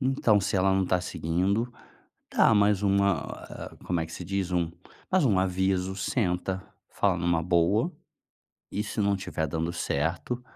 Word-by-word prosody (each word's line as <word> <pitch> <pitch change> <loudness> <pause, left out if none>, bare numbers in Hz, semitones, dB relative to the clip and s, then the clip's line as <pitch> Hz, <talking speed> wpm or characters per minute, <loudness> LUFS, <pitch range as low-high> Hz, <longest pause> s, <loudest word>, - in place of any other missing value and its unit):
Então 130 -6 +3
se 100 +1 -1
ela 95 +1 +3
não 95 0 +2
tá 90 - +2
seguindo, 95 +7 -1 0.6
dá - - +5
mais 105 -1 +3
uma 100 -4 +3
ah, - - -9
como 90 - 0
é - - -1
que 80 - -12
se - - -6
diz, 95 0 -2
um 85 -2 +1 0.4
mais 185 -4 +3
um 105 -8 +3
aviso, 95 0 0
senta, 95 -3 -1 0.3
fala 100 -3 +1
numa 85 -1 +1
boa, 90 - +2 0.8
e 105 - -1
se 105 - -7
não 100 0 +3
estiver 95 -4 -2
dando 80 +3 -2
certo, 85 - -2
95 Hz, 165 wpm, -27 LUFS, 85-100 Hz, 0.8 s, dá